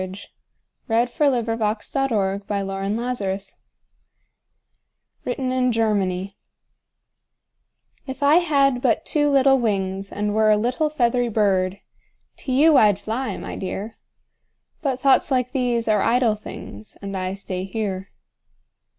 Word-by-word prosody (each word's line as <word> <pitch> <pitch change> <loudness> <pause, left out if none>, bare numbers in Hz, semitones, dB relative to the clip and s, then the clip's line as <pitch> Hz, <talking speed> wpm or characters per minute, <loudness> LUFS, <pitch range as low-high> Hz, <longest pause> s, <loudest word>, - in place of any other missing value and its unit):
SOMETHING 185 +1 -8 0.6
CHILDISH, 235 +1 0
BUT 265 -6 +3
VERY 205 -3 -1
NATURAL[313:1] 205 -4 -2 1.7
WRITTEN 255 +1 -2
IN 255 -1 +1
GERMANY 200 -4 0 1.7
If 265 +1 -5
I 290 +3 +6
had 275 -7 +2
but 245 -4 +1
two 295 -1 +2
little 270 -1 +4
wings 195 -3 -2
And 210 0 -2
were 215 0 +3
a 210 - +5
little 250 +8 0
feathery 245 -4 +1
bird, 195 -3 +1 0.6
To 265 - -5
you 295 +3 +5
I'd 210 -5 +5
fly, 230 +6 -3
my - - -6
dear! 195 +3 -5 0.8
But 270 -5 -1
thoughts 270 +1 +3
like 250 -2 0
these 245 -4 0
are 210 -2 +3
idle 235 0 +3
things, 110 - -9
And 200 0 -5
I 185 0 -3
stay 185 -1 -5
here. 195 -1 -4
225 Hz, 120 wpm, -22 LUFS, 195-255 Hz, 1.7 s, I